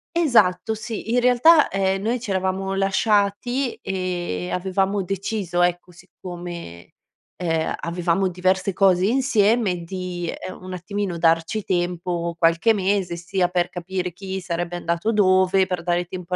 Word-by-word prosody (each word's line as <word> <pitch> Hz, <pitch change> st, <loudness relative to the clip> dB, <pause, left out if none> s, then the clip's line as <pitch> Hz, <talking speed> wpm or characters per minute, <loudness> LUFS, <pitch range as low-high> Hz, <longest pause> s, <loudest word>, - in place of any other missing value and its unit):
Esatto, 220 Hz, -, +3 dB
sì. 220 Hz, +1 st, -5 dB
In 245 Hz, -, +3 dB
realtà, 260 Hz, +6 st, +5 dB
ehm, 195 Hz, 0 st, 0 dB
noi 240 Hz, +3 st, 0 dB
c'eravamo 190 Hz, -3 st, -2 dB
lasciati 205 Hz, +6 st, +1 dB
e 190 Hz, -1 st, -3 dB, 0.4 s
e -, -, -6 dB
avevamo 195 Hz, +2 st, 0 dB
deciso, 195 Hz, -1 st, -2 dB
ecco, 175 Hz, 0 st, -1 dB
siccome, 175 Hz, -, -9 dB, 0.4 s
ehm, 165 Hz, -3 st, -1 dB
avevamo 175 Hz, +2 st, 0 dB
diverse 185 Hz, +1 st, 0 dB
cose 190 Hz, -1 st, +3 dB
insieme 220 Hz, -7 st, +2 dB
di, 180 Hz, -1 st, -4 dB
ehm, 185 Hz, -, -8 dB
un 185 Hz, 0 st, -8 dB
attimino 185 Hz, 0 st, -3 dB
darci 165 Hz, +5 st, +1 dB
tempo, 175 Hz, -2 st, -2 dB
qualche 170 Hz, +7 st, +3 dB
mese 190 Hz, -3 st, 0 dB
sia 180 Hz, +2 st, -1 dB
per 175 Hz, 0 st, 0 dB
capire 180 Hz, 0 st, -4 dB
chi 190 Hz, +1 st, -5 dB
sarebbe 175 Hz, -1 st, -3 dB
andato 170 Hz, +4 st, -1 dB
dove, 190 Hz, -2 st, +3 dB
per 180 Hz, -2 st, -3 dB
dare 175 Hz, 0 st, 0 dB
tempo 180 Hz, 0 st, -5 dB
185 Hz, 135 wpm, -22 LUFS, 175-200 Hz, 0.4 s, realtà